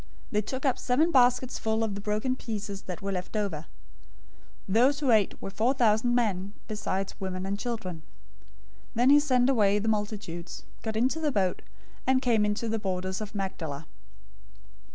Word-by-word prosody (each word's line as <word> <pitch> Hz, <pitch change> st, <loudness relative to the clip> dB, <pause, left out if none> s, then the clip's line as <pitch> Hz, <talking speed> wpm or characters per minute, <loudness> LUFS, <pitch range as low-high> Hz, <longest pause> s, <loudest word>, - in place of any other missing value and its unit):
They 210 Hz, -, +2 dB
took 260 Hz, +6 st, -4 dB
up 265 Hz, -, +2 dB
seven 300 Hz, +7 st, +2 dB
baskets 250 Hz, -1 st, +3 dB
full 220 Hz, 0 st, 0 dB
of 220 Hz, -2 st, -1 dB
the 200 Hz, -, -5 dB
broken 215 Hz, +5 st, 0 dB
pieces 210 Hz, -5 st, -5 dB
that 180 Hz, 0 st, -6 dB
were 200 Hz, -, -2 dB
left 185 Hz, +3 st, -3 dB
over. 170 Hz, -7 st, -2 dB, 1.0 s
015:038 190 Hz, -, -2 dB
Those 260 Hz, +6 st, +4 dB
who 275 Hz, -5 st, +2 dB
ate 215 Hz, -3 st, +3 dB
were 195 Hz, -, -6 dB
four 230 Hz, +7 st, +1 dB
thousand 235 Hz, 0 st, +3 dB
men, 200 Hz, -5 st, 0 dB
besides 195 Hz, -3 st, -2 dB
women 185 Hz, -1 st, -3 dB
and 200 Hz, +1 st, -2 dB
children. 220 Hz, -8 st, -3 dB
015:039 -, -, -16 dB, 0.9 s
Then 245 Hz, +3 st, +4 dB
he 290 Hz, -, +8 dB
sent 255 Hz, -4 st, +3 dB
away 210 Hz, -6 st, +4 dB
the 210 Hz, +2 st, -2 dB
multitudes, 205 Hz, -5 st, -3 dB, 0.2 s
got 220 Hz, -1 st, -3 dB
into 260 Hz, +7 st, +1 dB
the 305 Hz, -2 st, +1 dB
boat, 190 Hz, -6 st, 0 dB, 0.5 s
and 260 Hz, 0 st, +4 dB
came 230 Hz, -5 st, +2 dB
into 210 Hz, +3 st, -1 dB
the 225 Hz, 0 st, -1 dB
borders 185 Hz, 0 st, -2 dB
of 215 Hz, 0 st, -6 dB
Magdala. 160 Hz, -7 st, -4 dB
215 Hz, 175 wpm, -28 LUFS, 195-245 Hz, 1.0 s, he